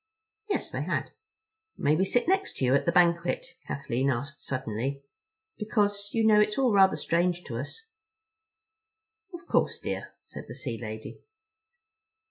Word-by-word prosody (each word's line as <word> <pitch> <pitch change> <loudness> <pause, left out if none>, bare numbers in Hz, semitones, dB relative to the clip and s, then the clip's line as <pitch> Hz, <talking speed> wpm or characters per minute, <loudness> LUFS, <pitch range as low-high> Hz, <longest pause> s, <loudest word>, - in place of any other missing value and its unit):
Yes—they 400 - -2
had. - - -2 0.7
"May 150 - +3
we 190 +4 +2
sit 245 +8 +1
next 385 +1 +1
you 130 -1 +3
at 140 - +2
the - - +4
banquet?" 170 0 +3 0.2
Kathleen 135 -1 -1
asked 140 +3 -3
suddenly, 130 +2 -3 0.6
"because, 205 -2 0
you 225 -1 +1
know, 215 -1 +6
it's 210 0 +2
all 260 -4 +3
rather 195 -1 +6
strange 175 +1 0
to 115 - -5
us." 295 - -7 1.5
"Of 345 0 -9
course, - - +1
dear," - - -5
said - - -10
the - - -8
sea 120 -6 -4
lady. 110 -1 -7
175 Hz, 140 wpm, -28 LUFS, 135-210 Hz, 1.5 s, know